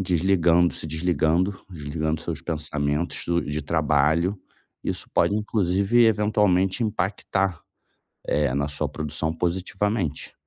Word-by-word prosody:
desligando, 90 -1 +3
se - - -5
desligando, 85 +3 +1 0.2
desligando 80 -1 -3
seus 80 -2 -4
pensamentos 75 0 -2
do 85 0 +1
de 75 +1 -3
trabalho. 80 +5 +2 0.4
Isso - - -3
pode 100 - +3
inclusive 105 +2 +2
eventualmente 105 -2 +2
impactar, 100 -3 -1 0.7
eh, 70 -3 +1
na 70 +1 0
sua 75 0 -2
produção 75 +1 -3
positivamente 90 0 -2
85 Hz, 110 wpm, -24 LUFS, 75-95 Hz, 0.7 s, desligando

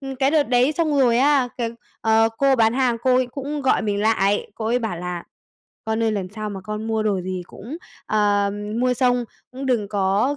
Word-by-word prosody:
ừm, 270 -1 -6
cái 270 +1 +2
đợt 305 -1 +4
đấy 250 +3 +3
xong 310 -3 0
rồi 240 -2 +4
á, 275 -1 +3
cái, 230 -2 -1 0.3
ờ, 225 0 +4
cô 275 -1 +4
bán 225 0 +3
hàng 255 -3 +2
cô 255 -1 +3
ấy 255 0 +2
cũng 280 +3 -5
gọi 265 - +2
mình 205 -2 -1
lại, 205 -2 +1
cô 220 - -4
ấy 240 +2 +2
bảo 220 -7 -3
là 175 -1 -5 0.6
"Con 220 +1 -1
ơi, 225 - +1
lần 195 -3 -3
sau 215 -1 -4
mà 195 -2 -6
con 215 +1 -4
mua 220 -1 0
đồ 200 -3 0
gì 185 0 -4
cũng, 245 +10 -9 0.3
ờ, 205 -1 +2 0.3
mua 250 0 +2
xong 245 -1 +2 0.3
cũng 265 +1 -6
đừng 230 -6 0
có, 205 +7 +1
230 Hz, 220 wpm, -22 LUFS, 210-260 Hz, 0.6 s, đợt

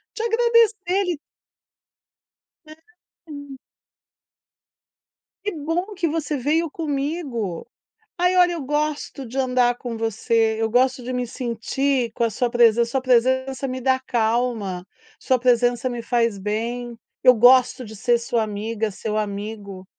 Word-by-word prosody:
de - - -4
agradecer, 455 -5 +2
ali 350 -6 -2 1.5
É, 310 - -11 0.6
hum. 285 -2 -9 1.9
"Que 415 - -2
bom 335 +6 -3
que 360 -3 -1
você 310 -1 -2
veio 305 +5 0
comigo. 280 - -3 0.5
Ai, 360 +1 +2
olha, 355 -1 +5
eu 330 - -4
gosto 295 0 -2
de 255 +4 -8
andar 250 -2 +2
com 240 -2 -6
você, 225 0 +1
eu 225 - 0
gosto 250 +2 +2
de 255 - -5
me 250 -1 -2
sentir 250 +1 -1
com 235 - -1
a 230 - +2
sua 245 +3 -1
presença. 235 -1 +4
Sua 265 0 0
presença 260 +2 +1
me 255 0 -4
dá 260 0 +2
calma, 225 -6 -1 0.3
sua 260 - +1
presença 245 0 +2
me 240 -1 -4
faz 230 -3 0
bem. 230 +4 -3 0.3
Eu 255 - +8
gosto 250 +2 +5
de 220 -2 -10
ser 240 +4 +2
sua 235 -1 -1
amiga, 215 +1 -3
seu 215 +2 -4
amigo". 200 -2 -5
250 Hz, 140 wpm, -22 LUFS, 230-285 Hz, 1.9 s, Eu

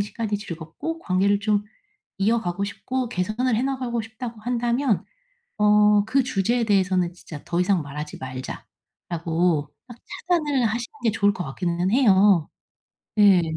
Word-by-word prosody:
시간이 210 +1 -2
즐겁고 200 - -6
관계를 200 - +1
좀 205 -1 +1 0.5
이어가고 200 -3 0
싶고 255 +5 -3
개선을 215 +5 0
해 240 - 0
나가고 255 -4 -2
싶다고 225 +1 -8
한다면 240 0 0 0.5
어 210 0 +5
"그 265 +4 +2
주제에 235 +1 0
대해서는 185 -4 +2
진짜 155 -4 -10
더 175 - -1
이상 185 -2 +2
말하지 150 +1 -7
말자."라고 160 +5 -3 0.2
딱 240 - -11 0.3
차단을 295 -7 +2
하시는 240 +6 -3
게 225 - +3
좋을 205 -1 +2
것 180 - -4
같기는 175 +5 -1
해요. 200 - +5 0.7
예. 200 -3 +7
205 Hz, 295 characters per minute, -24 LUFS, 180-235 Hz, 0.7 s, 예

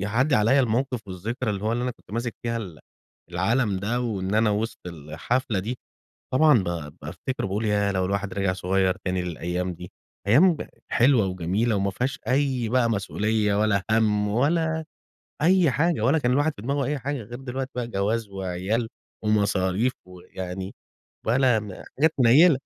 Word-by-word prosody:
يعدي 115 +9 +1
عليّا 120 +6 +4
الموقف 125 +1 0
والذكرى 110 +6 -3
اللي 100 -1 -3
هوَ 110 - +1
اللي 120 +1 -1
أنا 125 - 0
كنت 115 - -16
ماسك 120 +1 -2
فيها 115 0 -1
ال 90 -9 -7 0.5
العلم 105 +4 +1
ده، 110 +5 -1
وإن 100 -5 -2
أنا 110 0 +3
وسط 110 +3 -2
الحفلة 85 - -2
دي، 115 +6 -3 0.6
طبعًا 150 -3 +6
ب 80 -5 -4
بافتكر 90 - -4
باقول 100 +4 -2
ياه! 105 -1 +2
لو 95 -1 0
الواحد 100 +1 -2
رجع 100 -2 0
صغير 95 0 +1
تاني 90 0 0
للأيام 90 +1 -3
دي، 90 +1 -10 0.4
أيام 155 - +5 0.3
حلوة 125 -3 +4
وجميلة 95 +6 0
وما 100 0 0
فيهاش 125 +5 -2
أي 130 -3 +1
بقى 125 -1 +2
مسؤولية، 105 0 0
ولا 100 -2 +2
هَم، 105 -2 +2
ولا 160 +8 +1 0.6
أي 175 -3 +4
حاجة 160 -1 +1
ولا 135 +8 +3
كان 125 -2 +1
الواحد 145 +4 +2
في 100 - -10
دماغه 140 +2 -1
أي 145 -1 -1
حاجة، 140 +3 -3
غير 120 +4 -9
دلوقتي 135 0 -4
بقى 125 -1 -2
جواز 105 +1 -1
وعيال 95 +4 -2 0.3
ومصاريف 105 +2 +1
ويعني 90 +1 -7 0.5
ولا 125 -1 +3
م 105 -2 -8 0.3
حاجات 160 +2 +5
منيلة. 135 +5 +6
110 Hz, 165 wpm, -25 LUFS, 95-130 Hz, 0.6 s, طبعًا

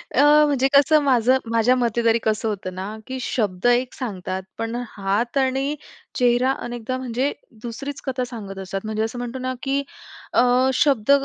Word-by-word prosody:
अ, 265 - +5 0.2
म्हणजे 275 -3 +2
कसं 295 +2 +6
माझं 255 -1 +4
माझ्या 230 +2 +3
मते 235 -2 0
तरी 230 0 +4
कसं 220 +1 0
होतं 185 -3 -5
ना 195 +4 -5
की 260 0 -4
शब्द 205 -5 -2
एक 245 +1 +2
सांगतात 190 -6 -4
पण 225 +1 -3 0.2
हात 205 +7 -1
आणि 270 +2 +1 0.4
चेहरा 250 +1 +3
अनेकदा 240 +1 -4
म्हणजे 260 +2 -1 0.3
दुसरीच 275 +4 -6
कथा 260 -2 -1
सांगत 195 -4 -7
असतात. 195 0 -4
म्हणजे 215 0 -1
असं 225 +2 -4
म्हणतो 245 +1 -5
ना, 255 0 -2
की 275 +1 0 0.5
अ, - - +5 0.3
शब्द 265 -3 +2
240 Hz, 165 wpm, -22 LUFS, 220-260 Hz, 0.5 s, कसं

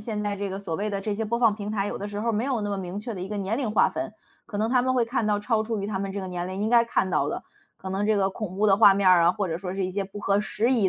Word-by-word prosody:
现 210 -1 -4
在 205 -1 -1
这 200 0 -4
个 195 - -4
所 170 -5 -4
谓 210 +4 -2
的 200 -1 -2
这 205 +1 -2
些 220 +2 -2
播 235 +2 -1
放 230 -3 +4
平 210 0 -5
台， 200 -2 -1
有 - - -3
的 205 - -5
时 205 0 -5
候 230 +2 0
儿 - - -1
没 215 - 0
有 255 -3 0
那 205 0 -2
么 200 - -1
明 190 +1 -5
确 230 +1 -5
的 185 - -6
一 185 - -5
个 210 - -4
年 200 +3 -1
龄 250 -6 -1
划 215 - +4
分。 215 - -4 0.3
可 205 - -6
能 220 +1 +1
他 250 0 +3
们 260 0 +1
会 245 - +3
看 230 -2 -1
到 205 -1 +2
超 220 +1 +1
出 225 0 -3
于 200 - -3
他 195 -2 -2
们 195 0 -3
这 200 - -4
个 190 - -5
年 180 0 -4
龄 185 - -5
应 215 - 0
该 235 0 +5
看 210 -4 0
到 150 -4 +1
的， - - -4 0.3
可 190 - -8
能 195 +2 -1
这 215 0 +2
个 195 -1 +2
恐 190 -3 -6
怖 215 - +2
的 195 -2 +5
画 205 -2 +7
面 195 -1 +3
儿 180 -2 +7
啊， 170 - +6
或 195 +1 -2
者 165 0 -3
说 185 0 -5
是 195 -1 -1
一 185 - -5
些 200 +1 -1
不 195 +1 -9
合 200 0 +1
时 225 +4 0
宜 215 -6 +3
205 Hz, 405 characters per minute, -26 LUFS, 195-220 Hz, 0.3 s, 画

